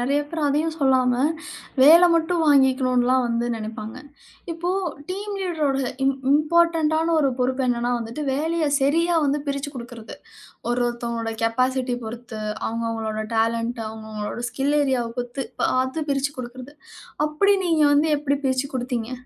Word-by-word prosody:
நெறைய 280 +4 +1
பேர் 325 -2 -3
அதையும் 310 +3 0
சொல்லாம 255 -2 +3 0.6
வேலை 335 +5 +8
மட்டும் 330 +1 +1
வாங்கிக்கணுன்லாம் 260 -2 +3
வந்து 235 +1 0
நெனைப்பாங்க. 220 0 -6 0.6
இப்போ 345 +2 -3 0.4
டீம் 405 +2 -4
லீடரோட 300 -7 0 0.2
இம் 270 0 +3 0.2
இம்பார்டன்ட் 320 +1 +3
டான 325 +1 +1
ஒரு 275 -3 +2
பொறுப்பு 260 +1 0
என்னன்னா 240 0 0
வந்துட்டு, 235 +6 -5
வேலைய 320 +1 0
சரியாக 325 +3 +2
வந்து 285 +1 +1
பிரிச்சிக் 280 +1 -3
குடுக்கிறது. 235 -2 -9 0.5
ஒரு 245 +1 0
ஒருத்தவங்களோட 235 -1 -3
கேபாசிட்டி 255 +2 +1
பொறுத்து, 230 -1 -7 0.3
அவுங்க, 230 +1 -2
அவங்களோட 220 -1 -3
டேலண்ட் 230 +1 0
அவுங்க, 220 0 -9
அவங்களோட 210 +3 -4
ஸ்கில் 280 +2 0
ஏரியா 265 -3 +1
வ - - -5
பொறுத்து 245 +2 -4 0.2
பார்த்து, 260 +4 0
பிரிச்சு 275 +1 -1
குடுக்கிறது. 255 +3 -8 0.5
அப்பிடி 400 +7 +3
நீங்க 320 -2 +3
வந்து 305 +2 +3
எப்பிடி 285 -1 0
பிரிச்சு 260 +1 0
குடுத்தீங்க? 245 -1 -3
265 Hz, 145 wpm, -23 LUFS, 240-300 Hz, 0.6 s, வேலை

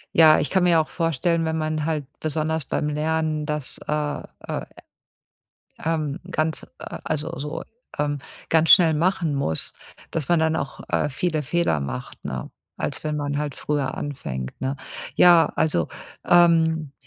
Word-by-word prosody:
Ja, 160 -1 +8
ich 145 - -1
kann 190 -2 +2
mir 170 -2 +5
auch 155 - 0
vorstellen, 165 0 0
wenn 160 0 -1
man 155 -1 -1
halt 155 -4 -1
besonders 155 0 -1
beim 150 - -1
Lernen 155 0 0
das, 150 -3 -3
äh 150 -1 -1 0.3
äh - - -3 1.2
ähm, 155 -1 -1
ganz 155 -1 -1
also, 155 +1 -4
so, 150 +2 -4 0.4
ähm, 145 -1 0 0.3
ganz 160 0 +4
schnell 165 -5 +8
machen 170 -1 +1
muss, 110 - -1 0.4
dass 160 -5 -2
man 175 - +4
dann, 160 0 +2
äh, - - 0
auch 140 - -5 0.3
viele 155 +2 -1
Fehler 170 - +1
macht, 65 -2 -6
ne, 65 -4 -4 0.3
als - - -2
wenn 150 -1 -1
man 145 -1 -2
halt 145 -2 -2
früher 145 -3 -1
anfängt, 65 - -4
ne? 135 +1 -1 0.4
Ja, 175 -2 +7
also, 150 - +1 0.4
ähm, 160 -4 +4
155 Hz, 150 wpm, -24 LUFS, 145-160 Hz, 1.2 s, Ja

